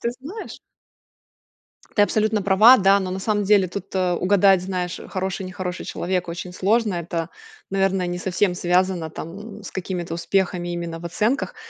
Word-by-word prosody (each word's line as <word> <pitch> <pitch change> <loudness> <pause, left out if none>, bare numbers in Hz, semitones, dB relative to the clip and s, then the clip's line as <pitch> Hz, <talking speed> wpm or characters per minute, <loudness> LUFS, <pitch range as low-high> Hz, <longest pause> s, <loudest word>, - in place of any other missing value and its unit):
ты 235 - -1
знаешь 375 +11 -8 1.4
Ты 205 - +5
абсолютно 215 0 +1
права 210 +6 +7
да 195 +1 +5
но 185 -1 -3
на 190 - -3
самом 205 +1 0
деле 195 -2 +4
тут, 195 +1 -7
э, 185 -1 +1
угадать 190 0 +4
знаешь 180 -1 -3
хороший 190 0 -3
нехороший 180 -1 -5
человек 180 -1 -2
очень 180 +1 -6
сложно 210 +2 +1
это 170 -1 -3 0.4
наверное 195 -1 +1
не 175 0 -3
совсем 185 0 0
связано 180 -2 +1
там 205 +7 -8
с - - -8
какими-то 180 -3 -4
успехами 175 +1 -1
именно 170 -1 -4
в 175 - -11
оценках. 215 +9 -1
185 Hz, 160 wpm, -22 LUFS, 175-200 Hz, 1.4 s, права